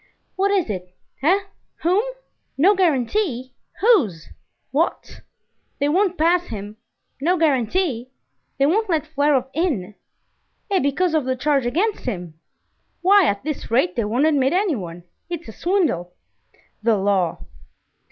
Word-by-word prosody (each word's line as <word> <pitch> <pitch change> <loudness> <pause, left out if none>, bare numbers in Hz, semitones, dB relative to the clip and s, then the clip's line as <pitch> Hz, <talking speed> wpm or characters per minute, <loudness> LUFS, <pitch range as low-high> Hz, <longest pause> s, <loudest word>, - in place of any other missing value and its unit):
"What 390 +1 +1
is 395 -4 +1
it? 180 -3 -6 0.3
eh? 365 +8 +3 0.4
whom?" 365 +5 +3 0.6
"No 365 +9 +5
guarantee? 280 - 0 0.3
whose? 270 - +3 0.4
what?" - - -1 0.6
"They 285 +1 +1
won't 370 +2 +2
pass 345 +3 +2
him?" 210 -1 -7 0.4
"No 355 +5 +2
guarantee?" 275 - +1 0.5
"They 275 - +3
won't 410 +8 +1
let 315 -3 +1
Flerov 290 -4 +1
in?" 270 - -1 0.8
"Eh, 385 - +3
because 320 +5 +1
of 310 -4 +1
the 260 0 0
charge 275 -1 +1
against 395 - -1
him?" 180 -9 -4 0.7
"Why, 390 -1 +6
at 200 -3 -1
this 305 -1 -4
rate, 225 -6 +2
they 230 - 0
won't 240 +8 +1
admit 280 -3 +2
anyone. 215 - -1 0.3
It's 345 -1 -5
a - - -7
swindle!" 275 - -1 0.7
"The 225 -1 +3
law!" 195 -3 0
285 Hz, 130 wpm, -22 LUFS, 225-360 Hz, 0.8 s, Why